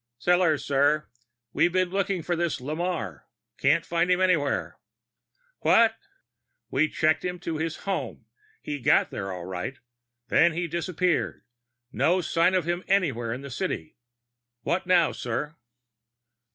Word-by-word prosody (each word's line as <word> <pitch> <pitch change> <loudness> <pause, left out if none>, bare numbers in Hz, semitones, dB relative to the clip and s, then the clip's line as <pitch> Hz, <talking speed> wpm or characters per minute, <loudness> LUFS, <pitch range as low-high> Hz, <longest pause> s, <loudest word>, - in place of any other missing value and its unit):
"Sellors, 175 +2 +2
sir. 145 +2 +2 0.5
We've 175 - +3
been 185 0 +1
looking 195 -2 -1
for 175 - -1
this 170 -1 -1
Lamarre. 150 - -3 0.3
Can't - - +3
find 170 +1 0
him 180 0 +3
anywhere." 175 -6 +1 0.8
"What?" 225 -1 +4 0.8
"We 155 +4 +2
checked 155 0 +1
him 180 0 -3
to 165 -3 -3
his 160 0 -2
home. 195 -1 -3 0.4
He 145 -1 -4
got 120 - +3
there, 95 0 -4
all 90 -2 -6
right. 95 +8 -5 0.5
Then 170 0 +4
he 175 +1 -2
disappeared. 170 +1 -1 0.5
No 165 +9 +2
sign 175 +1 +2
of 180 - +1
him 175 +2 -2
anywhere 140 - +1
in 125 +3 -4
the 140 -1 -8
city. 80 -7 -4 0.6
What 175 +1 -1
now, 175 -3 +4
sir?" 135 +6 -4
165 Hz, 140 wpm, -26 LUFS, 140-180 Hz, 0.8 s, What